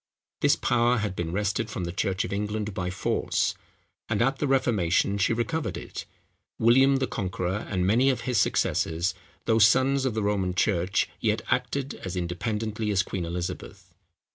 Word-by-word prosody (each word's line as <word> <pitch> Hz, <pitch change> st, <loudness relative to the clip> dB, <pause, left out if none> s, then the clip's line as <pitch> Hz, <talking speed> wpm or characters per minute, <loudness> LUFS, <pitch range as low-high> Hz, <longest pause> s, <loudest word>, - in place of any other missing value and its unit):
This -, -, +4 dB
power 120 Hz, 0 st, +2 dB
had 105 Hz, -3 st, -2 dB
been 85 Hz, -2 st, -3 dB
wrested 105 Hz, +3 st, -1 dB
from 105 Hz, -4 st, -4 dB
the 85 Hz, -, -3 dB
church 95 Hz, +1 st, -1 dB
of -, -, -5 dB
England 105 Hz, 0 st, -2 dB
by 90 Hz, -2 st, -2 dB
force; 90 Hz, -, 0 dB, 0.6 s
and 110 Hz, -2 st, 0 dB
at 135 Hz, +3 st, +1 dB
the 145 Hz, -, 0 dB
Reformation 100 Hz, -7 st, +2 dB
she 95 Hz, -, +2 dB
recovered 130 Hz, +8 st, -1 dB
it. -, -, -7 dB, 0.5 s
William 135 Hz, +4 st, +5 dB
the 135 Hz, 0 st, +1 dB
Conqueror, 95 Hz, -2 st, -3 dB
and 90 Hz, -2 st, 0 dB
many 120 Hz, +8 st, +4 dB
of 125 Hz, -3 st, 0 dB
his 125 Hz, -3 st, 0 dB
successors, 85 Hz, +3 st, +1 dB, 0.3 s
though 110 Hz, -1 st, +3 dB
sons 130 Hz, +4 st, +4 dB
of 125 Hz, -4 st, -1 dB
the 110 Hz, -, 0 dB
Roman 95 Hz, -3 st, 0 dB
church, 95 Hz, 0 st, +1 dB
yet 110 Hz, 0 st, 0 dB
acted 135 Hz, +2 st, -1 dB
as 95 Hz, -1 st, -6 dB
independently 105 Hz, +5 st, -2 dB
as 100 Hz, -2 st, +2 dB
Queen 95 Hz, -2 st, -4 dB
Elizabeth. 85 Hz, +1 st, -6 dB
105 Hz, 165 wpm, -26 LUFS, 95-120 Hz, 0.6 s, William